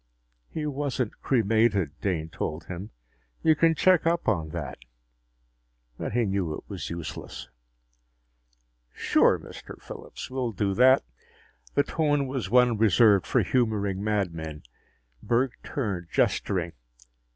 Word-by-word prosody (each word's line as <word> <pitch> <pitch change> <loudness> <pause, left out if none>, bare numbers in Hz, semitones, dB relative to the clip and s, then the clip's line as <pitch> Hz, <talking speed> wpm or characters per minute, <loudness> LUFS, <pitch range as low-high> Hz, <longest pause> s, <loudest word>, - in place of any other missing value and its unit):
"He 155 - -4
wasn't 140 -5 -2
cremated," 110 - +2
Dane 80 -5 -1
told 80 0 -4
him. 90 +5 -7 0.5
"You 160 -1 +5
can 165 +1 +3
check 180 +1 +4
up 170 0 0
on 80 -2 +1
that." 80 -3 -6 1.2
But - - -4
he 120 -1 +2
knew 95 -6 -1
it - - -9
was - - -6
useless. 85 -1 -7 1.5
"Sure, - - +3
Mr. - - -11
Phillips. - - -9
We'll 125 -3 -2
do 100 0 0
that." 130 - +5 0.7
The - - +4
tone 145 -3 +1
was 130 -7 -3
one 125 -1 +4
reserved 110 -2 +5
for - - +2
humoring 105 -6 0
madmen. 85 -8 -2 0.6
Burke 125 +2 0
turned, 100 - -3
gesturing. 90 -3 0
110 Hz, 120 wpm, -27 LUFS, 90-130 Hz, 1.5 s, You